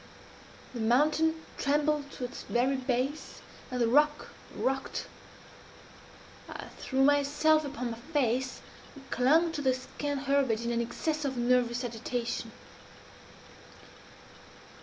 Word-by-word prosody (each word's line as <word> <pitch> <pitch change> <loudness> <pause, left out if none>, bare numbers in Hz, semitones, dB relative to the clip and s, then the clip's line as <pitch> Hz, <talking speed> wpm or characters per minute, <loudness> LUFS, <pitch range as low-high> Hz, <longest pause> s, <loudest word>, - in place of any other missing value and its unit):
The 240 - -5
mountain 300 +8 +3 0.2
trembled 295 0 +1
to - - -7
its 245 - -7
very 255 +3 +2
base, 260 +3 -2 0.3
and 250 -1 -3
the 235 - +3
rock 295 +4 +3 0.3
rocked. 270 +1 -2 1.4
I - - -7
threw 265 0 +1
myself 290 +2 +4
upon 260 -4 -4
my 230 - -7
face, 260 -2 -1 0.3
and 270 -1 -13
clung 315 +7 +4
to 300 - -3
the 260 -2 +2
scant 280 +2 -4
herbage 265 -5 +1
in 235 - 0
an 235 0 +1
excess 305 +6 -2
of 265 -3 -2
nervous 245 0 +2
agitation. 235 0 -3
265 Hz, 115 wpm, -30 LUFS, 245-290 Hz, 1.4 s, myself